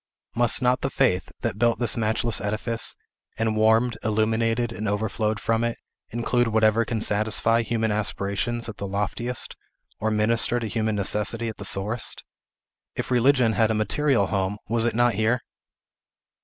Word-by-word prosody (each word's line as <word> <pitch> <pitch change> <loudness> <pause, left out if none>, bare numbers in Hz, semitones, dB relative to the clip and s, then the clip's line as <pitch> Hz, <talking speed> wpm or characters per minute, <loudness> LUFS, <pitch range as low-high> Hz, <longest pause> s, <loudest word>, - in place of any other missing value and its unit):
Must 120 +2 +3
not 125 +1 +2
the 135 - -1
faith, 110 -10 0
that 105 - -3
built 120 0 +3
this 120 -3 +1
matchless 110 0 0
edifice, 110 +3 -1 0.4
and 110 -1 0
warmed, 110 +2 +3
illuminated, 115 +2 0
and 110 -2 -3
overflowed 105 +1 -1
from 115 +2 0
it, 120 0 -1 0.3
include 120 +1 0
whatever 110 0 +3
can 115 - -2
satisfy 110 +2 +2
human 110 -1 -1
aspirations 105 +3 -1
at 115 - -8
the 100 - -5
loftiest, 105 +5 -3 0.4
or 110 - 0
minister 115 +3 +1
to 120 - -4
human 110 0 -1
necessity 105 +3 -1
at 110 - -8
the 100 - -8
sorest? 105 +5 +1 0.7
If - - -4
Religion 125 -2 +3
had 110 0 +2
a 110 - +1
material 115 +1 +2
home, 95 0 -1
was 115 +1 +1
it 115 - -2
not 120 0 +3
here? 110 +4 +1
110 Hz, 155 wpm, -24 LUFS, 105-120 Hz, 0.7 s, Must